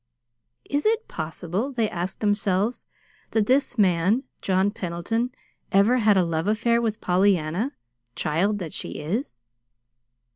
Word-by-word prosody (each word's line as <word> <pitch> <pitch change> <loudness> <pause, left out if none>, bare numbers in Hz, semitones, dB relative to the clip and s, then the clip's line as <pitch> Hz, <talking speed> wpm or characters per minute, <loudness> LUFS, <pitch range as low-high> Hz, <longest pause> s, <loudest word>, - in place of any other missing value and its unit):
"Is 285 +1 -1
it 450 +1 +1
possible," 175 - -3
they 230 -4 +1
asked 185 0 -4
themselves, 205 +1 0 0.4
"that 220 -2 +1
this 260 +1 +2
man, 195 +4 +3 0.2
John 190 +1 +2
Pendleton, 205 +5 -2 0.4
ever 205 +6 +4
had 215 -4 +4
a 185 - +4
love 165 +1 -1
affair 235 +2 +2
with 220 -2 -2
Pollyanna, 185 - +1 0.4
child 185 +8 +1
that 175 -6 -6
she - - -4
is?" 155 - -4
205 Hz, 125 wpm, -25 LUFS, 175-230 Hz, 0.4 s, ever